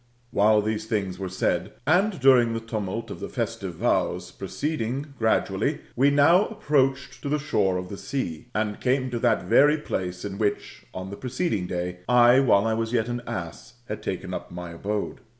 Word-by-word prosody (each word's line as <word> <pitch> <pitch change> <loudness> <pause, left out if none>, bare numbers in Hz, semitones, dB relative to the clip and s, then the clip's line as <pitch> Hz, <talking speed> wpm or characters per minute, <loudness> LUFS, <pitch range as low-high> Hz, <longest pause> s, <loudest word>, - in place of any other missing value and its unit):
While 105 +1 +4
these 110 0 -2
things 100 -4 -2
were 95 -1 -3
said, 95 - -1
and 185 +6 +2
during 125 -3 +5
the - - -1
tumult 110 -1 -4
of - - -7
the - - -5
festive - - -3
vows, - - 0
proceeding 140 -1 -3
gradually, 110 -1 +1
we 135 +3 +4
now 145 +8 +5
approached 135 -9 0
to 140 - -4
the 150 - +2
shore 95 -10 +1
of 90 0 -5
the 100 - -6
sea, 125 - -4
and 105 -1 -1
came 130 0 +1
to 120 - -2
that 115 -2 +2
very 145 +11 +5
place 90 - -4
in 100 0 -5
which, 105 -2 -2
on 95 +1 -6
the 100 - -7
preceeding 125 - -2
day, 90 0 -3
I, 125 +1 +6
while 115 -6 +4
I 110 - +1
was 115 +1 -2
yet 115 -1 +1
an 120 0 -3
ass, 85 +8 -6
had - - -5
taken - - -4
up - - -5
my 85 -1 -7
abode. 100 +8 -3
115 Hz, 185 wpm, -25 LUFS, 100-135 Hz, -, I